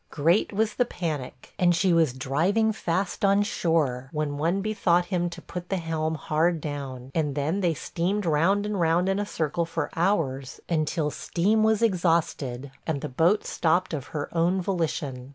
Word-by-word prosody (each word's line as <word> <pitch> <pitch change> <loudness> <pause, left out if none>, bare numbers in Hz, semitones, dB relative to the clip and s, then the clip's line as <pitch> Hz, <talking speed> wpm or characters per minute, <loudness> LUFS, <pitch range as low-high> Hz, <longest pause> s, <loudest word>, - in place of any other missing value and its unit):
Great 165 +7 +2
was 215 +1 0
the 245 - +2
panic, 160 - -5
and 175 -1 +4
she 185 0 +3
was 165 -5 +4
driving 170 - +1
fast 185 -1 -2
on 200 +1 +4
shore, 150 - 0
when 150 -2 -2
one 170 +5 +1
bethought 190 -4 +1
him 175 -1 +1
to 170 0 -10
put 180 0 -7
the 195 - 0
helm 160 -2 -2
hard 160 +2 +1
down; 135 -4 -6
and 150 -4 0
then 155 +7 0
they 170 -3 +1
steamed 185 +7 -2
round 170 +6 +2
and 210 -2 -2
round 170 +2 +2
in 195 +1 +1
a 205 - -2
circle 165 -2 -1
for 165 -2 -3
hours 155 -8 0
until 155 -2 0
steam 205 +9 +1
was 220 0 +3
exhausted, 165 - 0 0.2
and 150 -4 -1
the - - -4
boat 170 +11 +2
stopped 175 +2 +1
of 145 -3 -4
her 150 -3 -4
own 175 +3 +2
volition. 155 -8 -2
165 Hz, 175 wpm, -26 LUFS, 150-190 Hz, 0.2 s, and